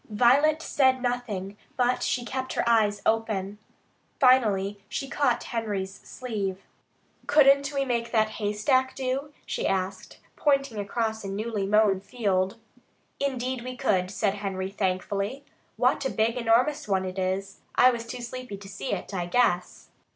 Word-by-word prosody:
Violet 280 +8 +4
said 260 -4 +3
nothing, 210 -6 -3 0.2
but 250 0 +2
she 245 -1 -1
kept 260 +1 -3
her - - -1
eyes 210 -3 +3
open. 210 -3 0 0.6
Finally 205 -6 +3
she 275 - -3
caught 270 -3 +1
Henry's 205 -5 -3
sleeve. 200 -6 -4 0.6
"Couldn't 280 -1 +5
we 275 -1 0
make 235 -2 -1
that 220 -2 +3
haystack 255 +6 +1
do?" 270 +2 -2
she - - -2
asked, 190 0 -2 0.2
pointing 275 -6 +1
across 220 +1 -2
a - - -5
newly 205 0 -2
mown 210 -2 +4
field. 195 -4 -1 0.6
"Indeed 260 -2 -2
we 255 0 -6
could," 185 -5 +1
said 200 0 0
Henry 195 -2 -4
thankfully. 200 +6 -2 0.3
"What - - +2
a 265 - 0
big, 225 0 +1
enormous 245 +4 +2
one 190 -2 +1
it 185 +1 -4
is! 190 +1 -2 0.2
I 255 - +7
was 235 -1 -5
too 245 +1 -6
sleepy 250 -3 -6
to 195 0 -12
see 200 +1 -4
it, - - -5
I 175 -2 -2
guess." 180 -4 0
225 Hz, 150 wpm, -27 LUFS, 195-255 Hz, 0.6 s, I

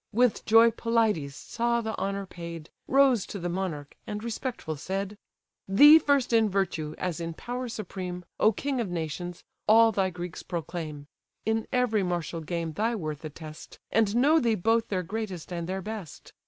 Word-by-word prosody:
With 245 +1 +2
joy 225 +1 +7
Pelides 220 -13 0
saw 235 +6 -1
the 220 -1 -3
honour 195 0 -2
paid, 170 -3 -8 0.2
Rose 265 -6 +4
to - - -6
the 175 -2 -3
monarch, 170 -6 -4
and 210 0 -4
respectful 235 - -4
said: 195 +6 -3 0.5
"Thee 290 +11 +9
first 280 -6 +2
in 225 -2 +4
virtue, 175 -6 -1
as 180 -2 -2
in 165 -1 -4
power 245 +4 -4
supreme, 180 -5 -5
O 215 - +5
king 265 +3 -2
of 215 - -3
nations! 175 +1 -4 0.2
all 225 +1 +7
thy 195 -2 +1
Greeks 175 -1 -6
proclaim; 160 -4 -5 0.4
In 220 +1 0
every 245 -4 +2
martial 175 -2 -2
game 165 0 -3
thy 225 +7 0
worth 155 -7 -5
attest, 155 0 -9
And 220 -1 +2
know 290 +7 +5
thee 235 -5 +2
both 225 +4 +2
their 185 -3 -1
greatest 190 -3 -5
and 170 0 -4
their 190 0 -3
best. 210 -6 -8
195 Hz, 170 wpm, -28 LUFS, 170-230 Hz, 0.5 s, Thee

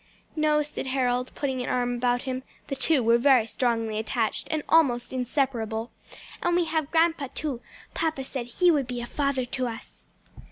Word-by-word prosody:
"No," 305 -1 +3
said 295 -2 -5
Harold, 250 -1 0
putting 265 -3 -2
an 245 - -3
arm 245 -1 0
about 245 0 0
him 260 -1 -3 0.3
(the 275 - -1
two 275 -1 +2
were 230 +1 +4
very 255 -3 +5
strongly 225 -2 -1
attached 220 0 -1
and 310 -2 -1
almost 260 -7 +3
inseparable); 245 -3 -1 0.5
"and 345 0 +1
we 350 -1 +3
have 315 -3 -1
grandpa 325 -3 +2
too: 280 -6 -3 0.3
papa 315 -4 -1
said 260 -2 -4
he 350 +9 +3
would 285 -5 +1
be 245 -1 -4
a 240 - -4
father 275 -1 -1
to 255 0 -2
us." 225 -1 -9
260 Hz, 175 wpm, -26 LUFS, 240-295 Hz, 0.5 s, very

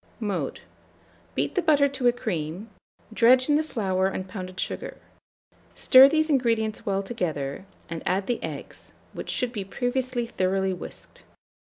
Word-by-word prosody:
Mode. 205 -4 -3 0.7
Beat - - -1
the 370 - +1
butter 295 -4 +4
to 270 -3 -1
a - - +7
cream; 190 -3 -4 0.4
dredge 250 +3 +5
in 295 - +5
the 305 - +3
flour 190 -9 0
and 190 -1 -4
pounded 185 -1 -7
sugar; - - -4 0.8
stir 260 +1 +8
these 315 +1 +2
ingredients 230 -8 0
well 195 0 0
together, 165 - -3 0.2
and 165 -1 -5
add 190 +1 0
the 245 - -2
eggs, - - -8 0.2
which - - -7
should 250 -1 -1
be 205 -4 -3
previously 245 +3 -2
thoroughly 190 -3 0
whisked. 180 - -10
220 Hz, 150 wpm, -26 LUFS, 190-255 Hz, 0.8 s, stir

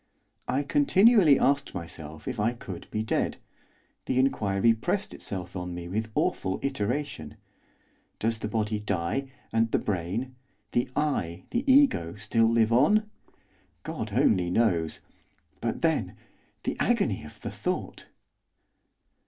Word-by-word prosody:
I 140 +2 +1
continually 170 - +5
asked 140 -4 +1
myself 80 -3 -8
if - - -3
I 110 +3 +2
could 95 -7 -9
be 110 0 -2
dead, 110 - 0 0.7
the 125 - -1
inquiry 115 -4 +3
pressed 110 - -2
itself 90 -2 -6
on 90 -1 -4
me 85 0 -6
with 110 +5 -2
awful 95 0 0
iteration. 125 - -3 0.8
Does 115 0 -1
the 105 - -3
body 105 0 -1
die, 105 +7 -2 0.2
and 115 0 +2
the - - +2
brain 105 +7 -3 0.4
the 120 +1 0
I, 90 - -1
the 265 +3 +2
ego 260 - +4
still 115 +2 +2
live 115 -1 +3
on? 210 - +4 0.7
God - - -5
only 90 -1 +3
knows. 90 -6 +1 0.6
But, - - -2
then! - - +1 0.5
the - - -1
agony - - +1
of - - -12
the - - -5
thought. - - -4
110 Hz, 130 wpm, -27 LUFS, 90-135 Hz, 0.8 s, continually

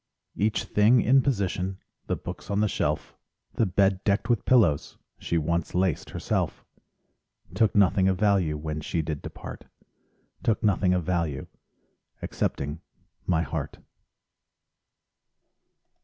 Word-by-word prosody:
Each 105 +2 0
thing 110 +4 +4
in 135 +3 +5
position: 95 -7 -1 0.3
The - - 0
books - - -8
on 100 0 0
the 105 - +3
shelf, - - -2 0.4
The 115 - +1
bed 95 +1 +2
decked 100 +4 +1
with 120 - 0
pillows 105 - +3 0.2
She 85 - -1
once 85 +3 -1
laced 90 -4 0
herself. - - -2 0.9
Took 110 +2 +2
nothing 95 -1 +4
of 95 -1 +2
value, 95 -7 +2
When 75 0 -4
she 80 +1 -2
did 75 -1 -4
depart, - - -9 0.8
Took 110 - 0
nothing 95 -3 +3
of 90 - 0
value— 85 -5 -1 0.7
Excepting 75 +4 -3 0.5
my 85 -3 +2
heart. 75 - -4
95 Hz, 125 wpm, -26 LUFS, 85-105 Hz, 0.9 s, in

